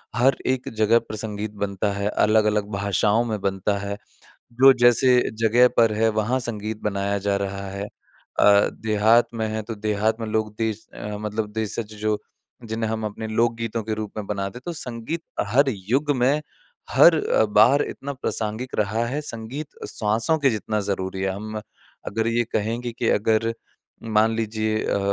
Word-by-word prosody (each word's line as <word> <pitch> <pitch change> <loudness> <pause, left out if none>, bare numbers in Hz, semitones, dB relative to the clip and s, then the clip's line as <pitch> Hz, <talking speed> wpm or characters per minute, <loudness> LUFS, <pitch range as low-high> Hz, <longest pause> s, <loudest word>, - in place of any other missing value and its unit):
हर 130 +4 +4
एक 130 -1 0
जगह 110 +2 +4
पर 110 - -8
संगीत 105 0 -4
बनता 100 +1 -1
है 100 +1 -2
अलग-अलग 105 -1 +2
भाषाओं 100 +3 +1
में 110 -3 -2
बनता 100 +1 0
है। 100 0 -4 0.6
जो 135 +3 +7
जैसे 125 +1 +5 0.2
जगह 115 +2 +5
पर 115 -2 +5
है 110 +1 +2
वहाँ 125 +5 0
संगीत 110 -2 -4
बनाया 100 -1 -1
जा 100 0 0
रहा 100 0 -4
है 100 +1 -4 0.6
अ, 100 0 +6
देहात 110 +2 +4
में 110 -1 -1
है 110 0 -3
तो 115 +1 -6
देहात 110 +2 0
में 115 - -3
लोग 110 -1 -1
देश 110 -1 -2
अ, 105 0 -5
मतलब 105 0 -3
देशज 110 0 -3
जो 105 -1 0 0.5
जिन्हें 110 0 -2
हम 110 0 -3
अपने 105 +1 -5
लोक 115 +2 +1
गीतों 115 0 -3
के 110 -1 -2
रूप 110 -1 -5
में 105 - -4
बनाते 100 +3 -4
तो 175 - -3
संगीत 130 +2 -5 0.2
हर 135 +7 +3
युग 120 +9 -1
में 135 +5 +2 0.5
हर - - +7
अ, - - +3
बार 110 +7 +5
इतना 140 +1 -5
प्रासंगिक 115 -2 -3
रहा 110 +3 0
है 140 +5 -2
संगीत 135 +2 -7
श्वासों 110 +9 +1
के 140 -3 +3
जितना 110 -1 -2
ज़रूरी 95 -1 -3
है। 95 - 0
हम 110 +2 -5 0.5
अगर 110 +2 -1
ये 120 +1 +1
कहेंगे 115 +3 -2
कि 115 0 -2
अगर 110 +2 +2 0.7
मान 110 +1 +4
लीजिए 110 -1 -1
अ, - - 0
110 Hz, 170 wpm, -23 LUFS, 105-115 Hz, 0.7 s, जो